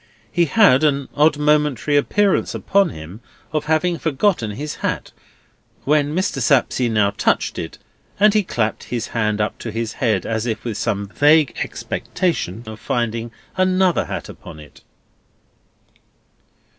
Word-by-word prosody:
He 175 -1 +2
had 160 - +5
an 140 -3 +1
odd 150 0 +4
momentary 150 -2 +1
appearance 195 +7 +2
upon 200 -2 +2
him 80 +8 -10 0.3
of 155 - -1
having 160 +2 +1
forgotten 160 - 0
his 145 +8 -5
hat, - - -3 0.7
when 150 +1 +1
Mr. 180 -7 -1
Sapsea 125 -1 +2
now 105 -3 +2
touched 100 - 0
it; - - -6 0.4
and 210 0 +5
he 215 - +4
clapped 110 - -2
his 120 -2 -4
hand 105 -2 -1
up 105 - -2
to 115 - -5
his 115 0 -3
head 110 -7 +1
as 110 +1 -2
if 110 -2 -3
with 115 -3 -3
some 100 -3 -1
vague 150 +4 +4
expectation 120 - -3
of 110 0 -9
finding 115 0 -2 0.3
another 185 -1 +2
hat - - -5
upon 75 - -11
it. 75 -1 -15
135 Hz, 145 wpm, -20 LUFS, 110-160 Hz, 0.7 s, had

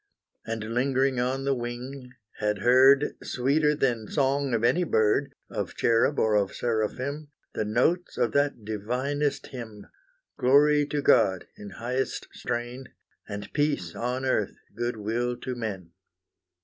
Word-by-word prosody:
And 110 0 -4
lingering 130 +1 +1
on 130 +2 -1
the 140 - +2
wing, 125 +1 -6 0.3
had 105 -1 -1
heard, 135 +4 +6
Sweeter 150 +4 +1
than 120 -6 0
song 140 +1 +1
of 115 - -1
any 170 +9 +3
bird, 135 0 +2 0.2
Of - - -4
cherub 115 +5 +2
or 110 - +2
of 100 -2 +1
seraphim, 125 +6 -2 0.3
The 110 - -2
notes 130 - +1
of 115 - +1
that 140 -5 0
divinest 125 +7 -2
hymn, 110 -5 -8 0.5
Glory 145 +3 +4
to 145 0 -2
God 95 -9 +4
in 105 - -9
highest 125 +3 -3
strain, 120 +2 -4 0.4
And 100 -1 -6
peace 145 - 0
on 125 +2 -2
earth, 110 -6 0 0.2
good 120 0 -2
will 120 +3 -2
to 130 - -5
men. 100 -8 -5
125 Hz, 135 wpm, -27 LUFS, 110-140 Hz, 0.5 s, heard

